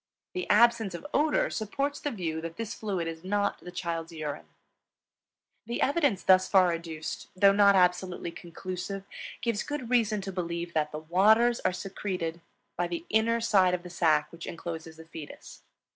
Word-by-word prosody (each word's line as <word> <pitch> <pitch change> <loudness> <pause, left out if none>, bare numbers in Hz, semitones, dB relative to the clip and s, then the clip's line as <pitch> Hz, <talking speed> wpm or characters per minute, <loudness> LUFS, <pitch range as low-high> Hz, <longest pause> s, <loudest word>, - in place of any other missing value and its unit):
The 365 - -4
absence 225 -3 +4
of 170 - -8
odor 300 +1 +2
supports 275 +7 -2
the 290 - -2
view 165 - -3
that 165 0 -7
this 230 -2 -4
fluid 190 -6 -3
is 165 0 -6
not 200 +2 0
the - - -10
child's 170 -2 -4
urine. 155 -3 -5 1.2
The 235 - -3
evidence 285 - +2
thus 185 0 +5
far 185 -3 +5
adduced, 165 -2 -5
though 195 +1 +6
not 200 0 +5
absolutely 180 -1 +1
conclusive, 185 +3 -6 0.4
gives 230 -3 0
good 290 -5 -5
reason 220 -4 +3
to 195 0 -5
believe 170 -1 -4
that 150 -1 0
"the 150 - -5
waters" 215 +9 +4
are - - +1
secreted 180 -3 -4 0.3
by 175 0 0
the 170 -1 -5
inner 230 +2 +3
side 195 -6 +4
of 175 - -7
the 180 - -9
sac 155 -3 +2
which 170 0 -9
incloses 165 -1 -6
the 160 - -12
fetus. 160 -2 -10
185 Hz, 170 wpm, -29 LUFS, 170-215 Hz, 1.2 s, though